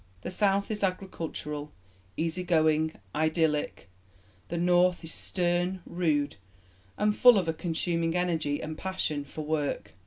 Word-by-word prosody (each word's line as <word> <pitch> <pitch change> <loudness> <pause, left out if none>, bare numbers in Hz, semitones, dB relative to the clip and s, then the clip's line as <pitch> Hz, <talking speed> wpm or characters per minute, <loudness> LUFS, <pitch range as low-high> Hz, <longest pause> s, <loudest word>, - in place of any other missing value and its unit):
The - - -4
South 200 +1 +2
is 210 -1 -3
agricultural, 165 -6 -3 0.5
easy 165 +3 -1
going, 160 -2 +2 0.2
idyllic; 155 - 0 0.6
the 170 - -3
North 175 +1 +3
is 165 - -4
stern, 175 0 -1
rude, 155 - 0 0.6
and 210 0 +2
full 245 -1 +7
of 185 -4 +1
a 165 - +1
consuming 165 0 -1
energy 165 -5 0
and 155 0 -4
passion 155 -5 -2
for 150 +2 -7
work. 145 -9 -2
165 Hz, 130 wpm, -29 LUFS, 155-180 Hz, 0.6 s, full